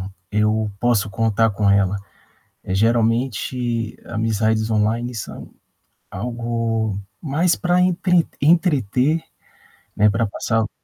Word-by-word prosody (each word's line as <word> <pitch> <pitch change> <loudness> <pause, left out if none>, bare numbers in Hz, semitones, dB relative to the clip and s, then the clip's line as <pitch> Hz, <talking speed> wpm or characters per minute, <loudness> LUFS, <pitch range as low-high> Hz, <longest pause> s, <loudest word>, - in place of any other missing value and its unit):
"Não, 95 +1 -6 0.2
eu 105 0 +1
posso 110 -4 +1
contar 115 0 +2
com 100 0 0
ela". 100 0 +3 0.7
Eh, 95 - -3
geralmente 115 +1 0
amizades 110 0 0
online 115 +3 0
são 105 - -7 0.6
algo 115 -1 -2 0.2
mais 160 +5 +1
pra 180 0 +1
entre 180 -1 +2
entreter, 150 - +2 0.8
né, 105 +1 +5
pra 115 +1 +1
passar 110 +2 -1
o 110 - -3
115 Hz, 110 wpm, -21 LUFS, 105-125 Hz, 0.8 s, né